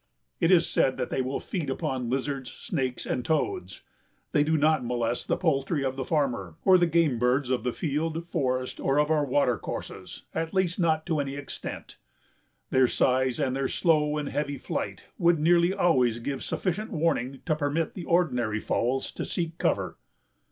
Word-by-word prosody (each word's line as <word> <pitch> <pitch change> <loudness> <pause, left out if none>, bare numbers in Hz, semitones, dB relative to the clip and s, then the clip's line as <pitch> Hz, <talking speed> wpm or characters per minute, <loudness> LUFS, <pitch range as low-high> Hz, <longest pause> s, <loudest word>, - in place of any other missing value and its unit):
It 165 - +3
is 175 -2 +5
said 130 -4 +2
that 125 -1 -3
they 130 - +1
will 130 +2 -2
feed 165 -7 -4
upon 130 -4 -2
lizards, 135 0 -2
snakes 130 -6 -3
and 125 - -2
toads. 365 - -2 0.5
They 145 - +4
do 160 +1 +2
not 155 -1 +3
molest 120 0 -1
the - - +1
poultry 145 -3 0
of 130 0 -1
the 135 - -3
farmer 125 - -1
or 185 -1 +7
the 175 - +4
game 160 -7 +2
birds 125 +2 +2
of 125 -3 0
the 125 - 0
field, 160 +4 -2
forest 130 -6 -1
or 135 +1 +1
of 150 +1 +2
our 155 -2 +3
water 130 -5 +2
courses, - - -7
at 165 +2 -3
least 185 -1 +1
not 160 -2 +2
to 160 -4 0
any 140 -1 -2
extent. 145 -1 -7 0.7
Their 130 -1 +5
size 130 +2 +1
and 135 -3 0
their 135 0 0
slow 150 -3 +2
and 150 -1 -2
heavy 145 -1 -2
flight - - -4
would 170 0 +4
nearly 170 +3 +4
always 130 - +2
give 135 +4 -4
sufficient 205 +4 -2
warning 140 -5 -1
to 155 - +1
permit 150 +2 -1
the 180 - -7
ordinary 125 -11 +1
fowls 130 +5 0
to - - -5
seek 165 -2 -3
cover. - - 0
145 Hz, 180 wpm, -27 LUFS, 130-165 Hz, 0.7 s, or